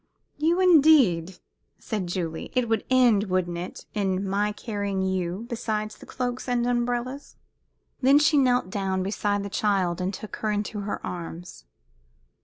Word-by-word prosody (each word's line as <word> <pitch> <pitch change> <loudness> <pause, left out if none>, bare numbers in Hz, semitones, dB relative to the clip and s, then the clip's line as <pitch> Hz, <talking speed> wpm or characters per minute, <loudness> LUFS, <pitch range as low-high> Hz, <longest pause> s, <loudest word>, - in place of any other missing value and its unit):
"You, 330 +4 +2
indeed!" 275 - +5 0.4
said 210 -5 -4
Julie. 170 -2 -4
"It 250 -2 +2
would 225 -2 0
end, 245 -5 +4
wouldn't 180 -3 -1
it, 180 - -7
in 195 -2 -1
my 205 +2 0
carrying 205 -3 -3
you 190 +2 -2
besides 215 -3 -3
the - - -15
cloak 250 0 -3
and 245 -1 +1
the 245 - +1
umbrellas?" 245 +3 -2 0.7
Then 270 +2 +6
she 295 0 +4
knelt 250 -8 +2
down 190 -2 -1
beside 205 +1 -1
the - - -4
child 190 -5 0
and 185 +1 -1
took 205 +2 -8
her 215 - -2
in 205 0 0
her 205 -1 -5
arms. 170 - -7
205 Hz, 155 wpm, -25 LUFS, 185-245 Hz, 0.7 s, Then